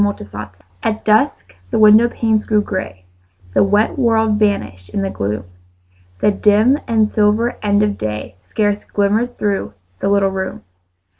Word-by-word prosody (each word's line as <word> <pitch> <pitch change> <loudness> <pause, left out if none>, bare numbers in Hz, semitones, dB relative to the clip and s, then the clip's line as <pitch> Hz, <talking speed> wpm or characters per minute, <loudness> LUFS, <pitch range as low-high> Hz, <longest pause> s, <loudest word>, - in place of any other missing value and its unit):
FORGIVENESS 105 - -4 0.3
At 220 0 -2
dusk 215 - +1 0.2
the - - -1
window 215 +2 +6
panes 220 -2 0
grew 210 -1 +2
grey; 95 - -5 0.5
The - - +4
wet 205 +7 +1
world 225 -3 +2
vanished 105 - -1
in 200 - -2
the 195 - -2
gloom; 105 +1 -3 0.8
The 210 - +4
dim 215 +7 +3
and 220 -3 +2
silver 215 +3 +1
end 205 0 +2
of 205 -1 -1
day 105 0 -5
Scarce 205 -1 -1
glimmered 215 +5 -1
through 195 - -2 0.2
the - - -1
little 200 -1 +2
room. 190 - -5
205 Hz, 150 wpm, -17 LUFS, 190-220 Hz, 0.8 s, window